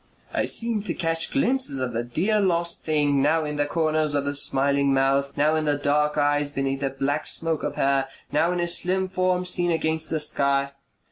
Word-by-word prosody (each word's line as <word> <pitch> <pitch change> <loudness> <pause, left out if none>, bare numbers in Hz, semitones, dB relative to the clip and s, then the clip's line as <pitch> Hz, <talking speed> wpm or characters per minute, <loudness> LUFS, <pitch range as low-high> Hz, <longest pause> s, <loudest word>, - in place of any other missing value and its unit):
I - - 0
seemed 225 -3 -1
to 170 - -2
catch 165 -2 -1
glimpses 265 - +1
of 130 -2 -3
the 115 +1 -2
dear 180 - 0
lost 170 -3 +1
thing, 145 -3 +1
now 155 +3 +2
in 150 0 -4
the 145 0 0
corners 155 -1 0
of 140 -1 0
a 145 - -1
smiling 140 0 +1
mouth, 135 +1 +1
now 150 +2 +3
in 155 -1 0 0.2
dark 150 +1 +1
eyes 145 0 +1
beneath 135 0 -2
a 135 - 0
black 135 +3 -2
smoke 165 -2 0
of - - -4
hair, 135 -1 +1 0.2
now 165 +4 +2
in 180 - -2
a 175 - 0
slim 185 +2 0
form 185 -1 0
seen 175 -1 +1
against 160 -1 0
the 160 - -1
sky. 140 -2 +1
150 Hz, 200 wpm, -24 LUFS, 140-170 Hz, 0.2 s, now